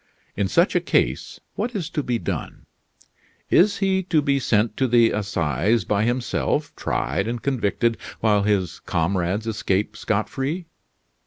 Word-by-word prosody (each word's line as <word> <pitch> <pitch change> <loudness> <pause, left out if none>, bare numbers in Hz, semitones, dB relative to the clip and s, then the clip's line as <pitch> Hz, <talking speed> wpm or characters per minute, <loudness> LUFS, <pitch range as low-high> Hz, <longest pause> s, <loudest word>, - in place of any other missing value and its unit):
In - - 0
such - - +2
a - - +5
case - - 0
what 245 -1 -3
is 180 -6 -2
to 150 - -1
be 125 -4 -1
done? - - -5 0.9
Is 205 +3 +5
he 190 -1 +1
to 160 - +4
be 140 -1 +2
sent 110 -3 +1
to 130 - +2
the 120 -1 +4
Assizes 100 - 0
by 105 +1 +1
himself, 120 +1 -1
tried 100 - -1
and 120 +1 -2
convicted, 115 -2 0 0.2
while 105 -2 +3
his 100 -5 0
comrades 90 +4 -1
escape 105 -1 -1
scot 105 0 -1
free? 150 +7 -3
115 Hz, 150 wpm, -23 LUFS, 100-135 Hz, 0.9 s, a